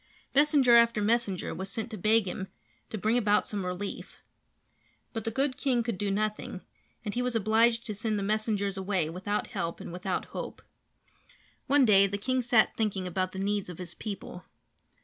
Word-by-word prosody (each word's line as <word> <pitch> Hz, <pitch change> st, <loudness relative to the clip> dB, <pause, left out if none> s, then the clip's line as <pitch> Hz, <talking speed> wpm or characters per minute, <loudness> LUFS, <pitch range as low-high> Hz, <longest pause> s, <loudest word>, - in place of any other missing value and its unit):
Messenger 280 Hz, -4 st, +6 dB
after 235 Hz, -2 st, +4 dB
messenger 210 Hz, -3 st, 0 dB
was 190 Hz, +1 st, -5 dB
sent 225 Hz, +2 st, -4 dB
to -, -, -4 dB
beg 215 Hz, +2 st, +3 dB
him 190 Hz, +1 st, -4 dB, 0.4 s
to 220 Hz, -, -4 dB
bring 220 Hz, +4 st, +2 dB
about 210 Hz, -2 st, +3 dB
some 205 Hz, -2 st, -3 dB
relief. 180 Hz, +2 st, -5 dB, 1.0 s
But 225 Hz, -3 st, -4 dB
the -, -, +1 dB
good 265 Hz, +3 st, 0 dB
king 255 Hz, -5 st, +1 dB
could 225 Hz, -5 st, -3 dB
do 205 Hz, -, 0 dB
nothing, 210 Hz, -2 st, -2 dB, 0.4 s
and 205 Hz, -, -3 dB
he 245 Hz, -, -1 dB
was 250 Hz, -1 st, -1 dB
obliged 225 Hz, +2 st, +3 dB
to 215 Hz, -, -3 dB
send 215 Hz, +1 st, -1 dB
the 200 Hz, -, -2 dB
messengers 205 Hz, -1 st, 0 dB
away 190 Hz, -5 st, -1 dB
without 205 Hz, +6 st, -3 dB
help 170 Hz, -5 st, -3 dB
and 170 Hz, -, -8 dB
without 180 Hz, +1 st, -2 dB
hope. -, -, -6 dB, 1.0 s
One 280 Hz, -1 st, +5 dB
day 200 Hz, -3 st, +6 dB
the 200 Hz, +1 st, -3 dB
king 255 Hz, +5 st, 0 dB
sat 235 Hz, -2 st, +3 dB
thinking 205 Hz, -4 st, -1 dB
about 185 Hz, +1 st, -1 dB
the -, -, -8 dB
needs 200 Hz, 0 st, -1 dB
of 175 Hz, -, -8 dB
his 175 Hz, -2 st, -6 dB
people. 195 Hz, -4 st, -7 dB
210 Hz, 185 wpm, -29 LUFS, 195-230 Hz, 1.0 s, Messenger